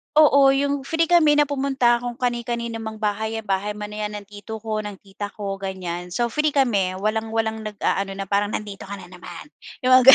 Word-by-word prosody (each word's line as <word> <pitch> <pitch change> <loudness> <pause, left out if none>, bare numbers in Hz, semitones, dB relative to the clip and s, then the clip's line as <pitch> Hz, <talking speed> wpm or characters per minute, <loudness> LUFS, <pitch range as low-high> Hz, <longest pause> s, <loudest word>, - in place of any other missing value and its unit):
Oo 280 -3 +7
iyong 280 0 0
free 330 +1 +1
kami 310 -4 +6
na 295 - +5
pumunta 270 -4 +2
kung 245 0 -4
kani-kanino 235 -2 -2
mang 220 -1 -7
bahay 220 +2 -1
yan. 225 - -3
Bahay 205 +1 -1
man 210 0 -6
yan 210 0 -4
ng 205 - -5
tito 210 +2 -9
ko, 215 -1 -2
ng 210 -1 -4
tita 200 +1 -6
ko, 195 -2 -4
ganyan. 180 -2 -5
So, 235 -1 +1
free 300 +3 +1
kami 200 -9 +2
walang 220 +1 -1
walang 220 -1 -1
nag-aano 200 -1 -1
na 195 - -4
parang, 200 +2 0
"Nandito 205 -2 -5
ka 200 - -5
na 180 -2 -10
naman." 180 - -10 0.3
Iyong 255 - +2
mga 255 +1 +10
220 Hz, 205 wpm, -23 LUFS, 200-255 Hz, 0.3 s, mga